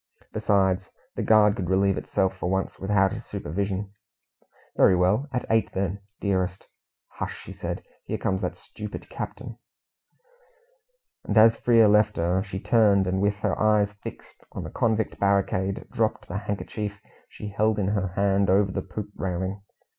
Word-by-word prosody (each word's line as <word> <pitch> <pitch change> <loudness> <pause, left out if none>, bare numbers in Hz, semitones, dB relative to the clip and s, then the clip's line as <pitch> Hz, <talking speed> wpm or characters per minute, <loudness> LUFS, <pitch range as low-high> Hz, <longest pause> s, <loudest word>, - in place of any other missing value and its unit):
Besides, 95 -2 +1 0.3
the - - -2
guard 105 -2 +5
could 90 -3 -3
relieve 95 0 +3
itself 95 0 -1
for 90 -1 -3
once 95 +1 -2
without 95 -1 +2
his - - -6
supervision. 100 +5 -3 0.8
"Very 95 - +5
well, 95 +10 +2
at 125 - -2
eight 110 0 +1
then, 95 +1 -2 0.2
dearest." 95 -2 -1 0.4
"Hush!" - - -7
said - - -5
she. - - -34 0.2
"Here - - -2
comes 95 -1 -1
that - - -2
stupid 105 -1 -9
captain." - - -6 1.6
And 105 - -1
as 110 +1 +7
Frere 115 -2 +5
left 105 0 +4
her, 90 +3 +1
she 95 -1 -5
turned, 100 -3 +4
and 95 +1 0
with 100 0 +2
her - - +1
eyes 105 -1 +3
fixed 105 - -11
on - - -5
the - - -7
convict 110 -1 0
barricade, 100 -1 +1
dropped 115 -3 -1
the 95 +4 -3
handkerchief 105 0 -4 0.3
she 105 - -7
held 105 +1 +1
in 100 -2 0
her 100 -2 0
hand 100 -1 +2
over 100 +1 +3
the - - -2
poop 100 +2 -7
railing. 95 +2 -3
100 Hz, 160 wpm, -26 LUFS, 95-105 Hz, 1.6 s, as